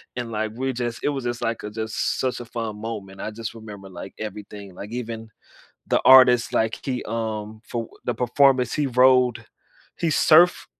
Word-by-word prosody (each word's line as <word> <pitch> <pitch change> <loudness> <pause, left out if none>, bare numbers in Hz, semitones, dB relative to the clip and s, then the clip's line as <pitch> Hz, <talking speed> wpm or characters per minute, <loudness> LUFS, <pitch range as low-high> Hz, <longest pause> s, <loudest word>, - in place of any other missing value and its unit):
and 120 -2 -4
like 110 0 -2
we 130 +2 -2
just, 120 -1 -4
it - - +2
was 140 -3 -3
just, 120 0 -3
like, 115 0 -2
a 105 - -5
just 110 0 -2
such 130 -1 -1
a - - -8
fun 115 -2 -5
moment, 100 -4 -6
I - - -3
just 110 0 -6
remember, 105 -3 -10
like, 95 +1 -9
everything, 105 -2 -8
like, 105 +3 -9
even 115 -2 -6 0.6
the - - +2
artist, 130 -2 +7
like, 110 +1 0
he, 130 -2 -3
um 110 -1 -4
for 115 -2 -4 0.2
the - - 0
performance 125 0 +3
he 150 -2 0
rode 125 -2 +3 0.5
he 170 - -1
surfed, 160 +3 +5
115 Hz, 185 wpm, -23 LUFS, 110-125 Hz, 0.6 s, artist